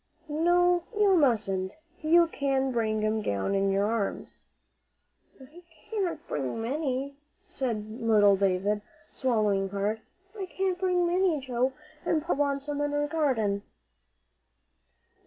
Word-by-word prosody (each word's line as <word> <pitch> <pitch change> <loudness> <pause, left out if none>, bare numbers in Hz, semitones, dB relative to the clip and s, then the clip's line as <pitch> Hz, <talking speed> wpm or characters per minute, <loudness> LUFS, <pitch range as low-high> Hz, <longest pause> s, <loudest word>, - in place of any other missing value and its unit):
"No, 350 +3 +3
you 405 -2 +5
mustn't; 205 - +1 0.3
you 335 +2 +5
can 270 -4 0
bring 215 -3 0
'em 215 0 0
down 100 - -1
in 195 0 +2
your 195 +1 +2
arms." 215 -2 -3 0.9
"I 295 +7 -14 0.3
can't 350 -7 -2
bring 135 - -3
many," 275 +2 -2 0.3
said 235 - -4
little 210 -3 +5
David, 195 +2 +1 0.3
swallowing 210 -6 +1
hard. 205 +3 -2 0.3
"I 390 -3 -5
can't 375 0 -2
bring 360 -2 +2
many, 350 -2 +2
Joe, 260 0 -1 0.3
an' 315 - +1
Polly'll 320 -2 -2
want 280 -1 0
some 290 0 -3
in 290 0 -1
her 290 0 0
garden." 255 -11 0
265 Hz, 125 wpm, -28 LUFS, 210-325 Hz, 0.9 s, you